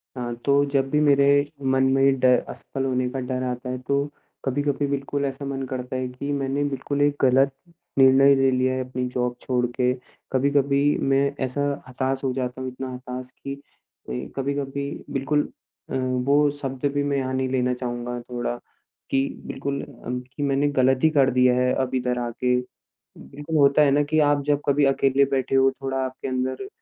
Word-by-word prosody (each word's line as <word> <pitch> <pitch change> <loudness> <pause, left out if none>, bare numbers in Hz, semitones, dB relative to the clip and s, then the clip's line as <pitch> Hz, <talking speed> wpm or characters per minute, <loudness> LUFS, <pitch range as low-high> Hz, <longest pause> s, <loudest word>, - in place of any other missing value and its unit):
हाँ, 120 -2 -3
तो 140 0 +4
जब 135 -1 0
भी 150 - +2
मेरे 140 -2 +4 0.4
मन 130 0 +2
में 135 0 +3
ड 130 - +1 0.2
असफल 135 -1 -5
होने 130 -1 0
का 135 - -4
डर 130 0 -3
आता 125 0 -4
है 130 - -2
तो 140 0 +1 0.4
कभी-कभी 145 +1 0
बिल्कुल 140 0 -2
ऐसा 140 +1 -4
मन 135 -1 -3
करता 125 -1 -4
है 130 0 -1
कि 140 +3 -5
मैंने 140 0 -1
बिल्कुल 140 0 -2
एक 145 0 +3
गलत 135 +1 +4 0.5
निर्णय 135 +1 +7
ले 135 0 +3
लिया 130 0 +1
है 130 0 -1
अपनी 125 0 -2
जॉब 125 -1 -1
छोड़ 125 -1 0
के। 125 -1 +2 0.4
कभी-कभी 140 +1 +2 0.2
मैं 135 +1 +3 0.2
ऐसा 130 +2 -2 0.3
हताश 130 +1 -2
हो 130 - +1
जाता 125 0 -3
हूँ 130 - -3
इतना 130 0 -6
हताश 125 0 -7
कि 140 0 -6 0.5
ए, 60 - -5
कभी-कभी 140 0 -2 0.2
बिल्कुल 140 +2 +1 0.5
अ, - - -3
वो 130 +3 +2
शब्द 135 0 -4
भी 145 - 0
मैं 140 -1 0
यहाँ 130 -1 -2
नहीं 130 0 0
लेना 125 -1 +1
चाहूँगा 120 -1 -4
थोड़ा 120 0 -4 0.6
कि 135 0 +2 0.2
बिल्कुल 140 +1 -3 0.2
अम, 125 +1 -2
कि 130 +3 -7
मैंने 140 +1 +2
गलत 130 0 +4
ही 160 - +6
कर 140 -4 +4
दिया 125 0 +4
है 125 0 +2
अब 130 0 -2
इधर 125 -1 0
आके। 120 +1 0 0.6
बिल्कुल 150 +3 -5
होता 140 +1 +5
है 145 - +4
ना 145 +2 +3
कि 155 - +2
आप 145 -1 +3
जब 145 -1 +2
कभी 145 +1 +3
अकेले 135 0 +3
बैठे 135 -1 0
हो, 135 0 +5
थोड़ा 135 0 -4
आपके 130 +1 -5
अंदर 130 +8 -2
135 Hz, 190 wpm, -24 LUFS, 125-140 Hz, 0.6 s, निर्णय